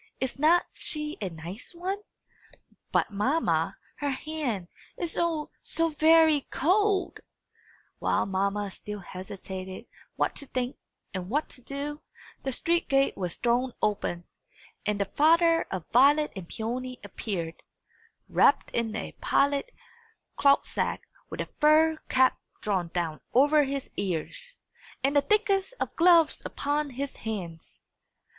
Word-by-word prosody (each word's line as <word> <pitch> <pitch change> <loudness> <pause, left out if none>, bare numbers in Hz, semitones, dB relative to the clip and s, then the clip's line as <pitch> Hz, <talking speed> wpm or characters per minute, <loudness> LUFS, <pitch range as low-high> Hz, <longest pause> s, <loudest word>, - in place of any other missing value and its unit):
Is 265 +1 -3
not 330 +4 +5
she 300 0 -3
a 195 - -1
nice 175 - -8
one? 375 +4 -3 0.9
But, - - +2
mamma, 260 +11 +1 0.2
her 290 - -1
hand, 265 - -3 0.3
is 340 -2 -2
oh, 330 -3 0
so 330 0 0
very 315 -1 +5
cold!" 390 +5 +2 0.8
While - - +1
mamma 200 +1 -1
still 210 +1 -7
hesitated 185 +1 -7 0.3
what - - 0
to 280 - -6
think 255 0 -2 0.4
and 185 -1 -4
what 295 +6 0
to 255 - -6
do, 285 +4 -5 0.4
the 270 - -2
street 335 +6 0
gate 275 -1 +3
was 180 -3 -3
thrown 245 +1 +1
open, 185 -4 -1 0.6
and 210 -1 0
the 200 - +2
father 330 - +4
of 185 -4 -4
Violet 285 +5 +5
and 185 -3 -8
Peony 250 +3 -4
appeared, 170 -7 -4 0.7
wrapped - - +4
in 230 -2 -1
a - - -4
pilot 280 - +2 0.6
cloth 280 0 +4
sack, - - -2 0.2
with - - -4
a - - -5
fur 310 +1 +5
cap 260 0 +4 0.2
drawn 190 -5 0
down 165 -2 -3
over 290 +3 +5
his 275 0 -4
ears, 200 - -3 0.4
and 275 +2 +2
the 285 - +6
thickest 420 +3 +1
of - - -3
gloves 335 -2 +5
upon 290 +1 -1
his 275 +2 -4
hands. 180 -7 -6
275 Hz, 135 wpm, -28 LUFS, 200-310 Hz, 0.9 s, the